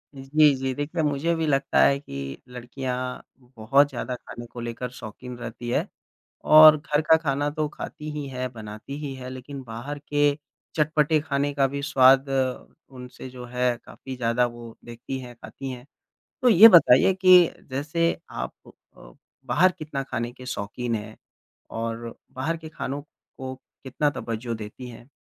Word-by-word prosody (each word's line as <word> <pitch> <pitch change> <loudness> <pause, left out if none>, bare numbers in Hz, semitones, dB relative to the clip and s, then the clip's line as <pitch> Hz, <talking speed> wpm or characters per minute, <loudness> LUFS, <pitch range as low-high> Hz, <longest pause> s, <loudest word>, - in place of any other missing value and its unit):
जी, 145 +2 +4
जी। 130 0 -2
देखिए 150 +4 -2
मुझे 150 +3 0
भी 160 -1 -1
लगता 140 -1 +1
है 140 0 +4
कि 70 - -7
लड़कियाँ 125 +1 -5 0.2
बहुत 130 +3 +2
ज़्यादा 125 - -4
ख़ाने 120 -1 -10
को 120 - -10
लेकर 120 +1 -5
शौकीन 120 +2 -9
रहती 120 0 -7
है। - - 0 0.6
और 155 0 +9
घर 150 0 -1
का 160 - +8
ख़ाना 145 -2 -1
तो 155 0 -2
खाती 150 +1 -8
ही 150 -1 -5
है 130 -1 -4
बनाती 110 +4 -8
ही 145 -2 -4
है 130 -1 -8
लेकिन 130 +2 -8
बाहर 120 +5 -6
के 145 0 0 0.5
चटपटे 155 0 +2
ख़ाने 145 -1 -1
का 140 -1 +3
भी 140 +1 -5
स्वाद 135 -1 +5 0.6
उनसे 125 0 -10
जो 125 -1 -9
है 125 0 0
काफ़ी 130 -1 -9
ज़्यादा 120 0 +1
वो 120 -1 -10
देखती 120 +3 -6
है 125 -1 -10
खाती 135 +3 -8
हैं। 125 +1 -9 0.6
तो 250 - +5
ये 215 +1 +10
बताइए 170 - +6
कि 185 0 +10 0.3
जैसे 155 +5 0 0.2
आप - - -5
प - - -13 0.3
अ, - - -15 0.3
बाहर 170 +9 +4
कितना 155 -5 -5
ख़ाने 120 -2 -4
के 130 - -12
शौकीन 120 0 -3
हैं? 110 0 -7 0.5
और 115 +1 -5 0.2
बाहर 155 +6 -2
के 160 -1 -10
ख़ानों 145 -2 -5 0.4
को 130 -1 -6 0.3
कितना 145 +3 0
तवज़्ज़ो 115 -3 -4
देती 110 +4 -8
हैं? 120 +2 -13
130 Hz, 165 wpm, -25 LUFS, 120-145 Hz, 0.6 s, ये